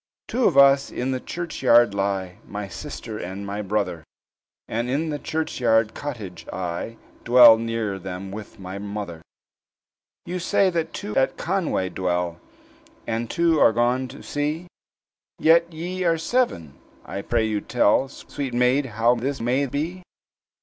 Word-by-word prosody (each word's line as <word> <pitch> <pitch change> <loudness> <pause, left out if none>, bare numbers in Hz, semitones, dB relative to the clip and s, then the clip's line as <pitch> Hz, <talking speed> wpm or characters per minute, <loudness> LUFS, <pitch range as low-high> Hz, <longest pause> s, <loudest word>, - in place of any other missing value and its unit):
"Two 250 -1 0
of 150 - +3
us 140 0 +6
in 130 +2 -2
the 130 - -1
churchyard 125 -9 +2
lie, 100 -2 -2
My 100 0 -5
sister 110 - -7
and 95 +2 -6
my 100 +1 -4
brother; 100 -5 -2 0.6
And, 120 +2 -2
in 150 +5 0
the 145 - -3
churchyard 115 -9 +1
cottage, 100 - -7
I 95 +5 -4 0.3
Dwell 120 -2 +8
near 115 -4 -2
them 95 +1 -6
with 105 +1 -9
my 95 0 -7
mother." 100 -5 -6 1.0
"You 180 +1 -3
say 185 +2 +2
that 165 -2 -1
two 105 - -6
at 130 - +2
Conway 170 - -1
dwell, 90 -2 -2 0.7
And 115 0 -2
two 165 -2 +2
are 110 - +6
gone 125 +3 +1
to 130 +3 -11
sea, 150 +4 -2 0.7
Yet 170 +1 +4
ye 180 +3 -4
are 165 -2 +3
seven? 160 - 0 0.3
I 100 - -5
pray 115 +1 0
you 105 -2 -1
tell, 130 +6 +2
Sweet 135 -2 -6
maid, 125 +3 +3
how 115 +2 +4
this 130 +3 -2
may 130 +4 +1
be?" 160 +8 -3
120 Hz, 150 wpm, -24 LUFS, 100-145 Hz, 1.0 s, Dwell